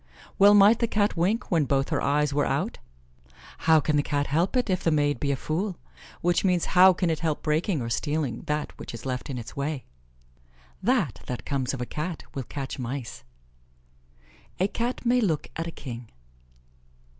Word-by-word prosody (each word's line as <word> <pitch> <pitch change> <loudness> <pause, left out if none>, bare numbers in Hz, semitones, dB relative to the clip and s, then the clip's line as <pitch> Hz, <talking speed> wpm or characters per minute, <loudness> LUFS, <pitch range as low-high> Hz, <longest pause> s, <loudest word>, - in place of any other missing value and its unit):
"Well 205 +1 +8
might 205 +3 +7
the 235 - +2
Cat 210 -1 +1
wink 200 +9 0
when 165 -4 +3
both 135 0 +1
her - - 0
eyes 145 0 +1
were 145 0 +1
out?" - - -1 0.9
"How 160 -1 +8
can 150 0 +1
the - - +4
Cat 145 0 -1
help 170 - +1
it, 250 - +1
if 185 -3 0
the - - +3
maid 145 -4 +1
be 140 - 0
a - - +1
fool?" 175 +8 -2 0.4
Which 175 0 +2
means 180 -3 +2
how 185 +1 +8
can 180 -1 0
it 160 - -1
help 160 -3 -2
breaking 155 +1 0
or 115 - -4
stealing 135 +1 -1
that 150 0 -2
which - - -7
is 115 - -9
left 130 +2 -3
in 135 - -3
its 120 -2 -8
way? 140 -1 -3 1.0
"That 195 - +1
that 125 - -5
comes 135 -2 -1
of 125 - -6
a - - -1
Cat 155 +5 -4
will 135 - -3
catch 135 0 -6
mice." 120 - -5 1.4
"A 190 - +3
Cat 240 +4 -3
may 245 +1 +3
look 165 -9 0
at 165 +1 -3
a - - -4
king." 120 -6 -8
155 Hz, 190 wpm, -26 LUFS, 140-185 Hz, 1.4 s, Well